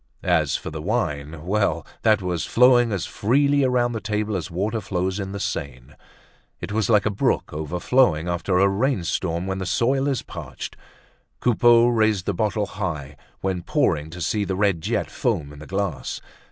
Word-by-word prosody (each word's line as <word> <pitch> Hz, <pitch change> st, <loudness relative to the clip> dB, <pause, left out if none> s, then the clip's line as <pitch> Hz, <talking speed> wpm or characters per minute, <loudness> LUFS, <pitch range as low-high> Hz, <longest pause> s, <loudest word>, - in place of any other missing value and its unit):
As -, -, +2 dB
for -, -, -4 dB
the 80 Hz, 0 st, -6 dB
wine, 80 Hz, -6 st, -2 dB
well, 90 Hz, -5 st, 0 dB, 0.2 s
that 110 Hz, -3 st, +3 dB
was 90 Hz, -4 st, -1 dB
flowing 120 Hz, +3 st, +4 dB
as 95 Hz, -5 st, -1 dB
freely 140 Hz, +6 st, +2 dB
around 125 Hz, -2 st, +2 dB
the 110 Hz, -2 st, -4 dB
table 105 Hz, 0 st, -1 dB
as 90 Hz, -1 st, -3 dB
water 105 Hz, +6 st, -2 dB
flows 95 Hz, 0 st, -2 dB
in 95 Hz, -1 st, -4 dB
the 100 Hz, -, -5 dB
Seine. 65 Hz, -5 st, -5 dB, 0.7 s
It -, -, -6 dB
was 110 Hz, +1 st, 0 dB
like 105 Hz, -3 st, +4 dB
a 105 Hz, -, +1 dB
brook 100 Hz, -, 0 dB
overflowing 85 Hz, -, +1 dB
after 90 Hz, +2 st, 0 dB
a 100 Hz, +1 st, +5 dB
rainstorm 95 Hz, -, 0 dB
when 95 Hz, 0 st, -3 dB
the 95 Hz, -, -3 dB
soil 130 Hz, +8 st, +1 dB
is 135 Hz, -3 st, -1 dB
parched. -, -, -8 dB, 0.6 s
Coupeau 120 Hz, 0 st, +5 dB
raised 110 Hz, -5 st, +2 dB
the 100 Hz, -, 0 dB
bottle 105 Hz, +2 st, 0 dB
high 80 Hz, -9 st, -5 dB, 0.3 s
when 95 Hz, -2 st, -1 dB
pouring 75 Hz, -2 st, 0 dB
to 85 Hz, +2 st, -8 dB
see 105 Hz, +4 st, 0 dB
the 95 Hz, -1 st, -2 dB
red 100 Hz, -4 st, +1 dB
jet 110 Hz, +5 st, -1 dB
foam 75 Hz, -1 st, -1 dB
in 75 Hz, -, -12 dB
the 75 Hz, -, -10 dB
glass. 95 Hz, -6 st, -3 dB
100 Hz, 180 wpm, -23 LUFS, 85-110 Hz, 0.7 s, a